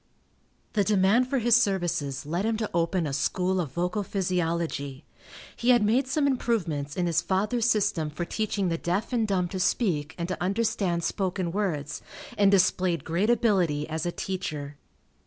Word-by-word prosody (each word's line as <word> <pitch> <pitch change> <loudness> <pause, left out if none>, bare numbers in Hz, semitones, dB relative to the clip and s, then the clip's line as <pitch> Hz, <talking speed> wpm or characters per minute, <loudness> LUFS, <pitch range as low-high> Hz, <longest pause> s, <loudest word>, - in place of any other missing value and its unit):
The 205 - +3
demand 210 +5 +3
for 270 +1 0
his 240 -1 +4
services 175 - 0
led 170 +6 -1
him 225 0 0
to 220 -1 -2
open 170 +1 +1
a 140 - -3
School 180 +6 0
of 145 -7 -6
Vocal 180 +6 -1
Physiology. 170 -7 -2 0.5
He 240 - -1
had 240 -3 +6
made 245 +6 +2
some 285 +2 +1
improvements 175 - -1
in 180 - +1
his 165 -1 +2
father's 215 +6 0
system 190 -8 +1
for 165 +3 -4
teaching 200 -1 -1
the 165 -1 -1
deaf 190 +8 -2
and 225 -3 +1
dumb 185 -3 +1
to 190 - -4
speak 160 - 0
and 170 -1 -3
to 185 - -4
understand 195 -3 0
spoken 185 -2 -1
words, 160 -7 -2 0.3
and 200 -1 +4
displayed 185 -2 +2
great 175 +7 0
ability 185 -11 +2
as 160 +1 -3
a - - 0
teacher. 155 -7 -4
185 Hz, 170 wpm, -27 LUFS, 165-215 Hz, 0.5 s, had